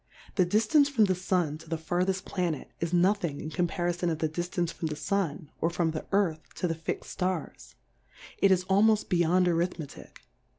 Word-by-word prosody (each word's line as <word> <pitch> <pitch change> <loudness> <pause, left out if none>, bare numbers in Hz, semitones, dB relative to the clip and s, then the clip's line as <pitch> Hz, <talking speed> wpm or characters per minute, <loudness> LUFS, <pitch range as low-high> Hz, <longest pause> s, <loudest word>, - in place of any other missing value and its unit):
The 185 -3 +2
Diftance 225 - +4
from 235 -7 +4
the 190 - +2
Sun 180 -4 -1
to 160 - -14
the 165 - -1
fartheft 180 +4 -1
Vianet^ 175 -6 -2
is 170 0 -2
nothing 175 -4 +2
in 155 - -6
Comparifon 175 0 0
of 160 - -1
the 160 - 0
Diftance 175 +1 -2
from 165 - -3
the 155 - -3
Smi^ 165 -2 -2
or 165 - +2
from 170 -1 0
the 155 - -5
Earthy 185 -6 +2
to 180 - -1
the 165 - 0
fix'^d 165 0 -4 0.2
Stars^ 180 -3 -3 0.6
it 195 - +5
is 185 -1 +3
almoft 210 +3 +3
beyond 175 +1 +3
Arithmetick. 170 - -3
175 Hz, 180 wpm, -28 LUFS, 165-190 Hz, 0.6 s, it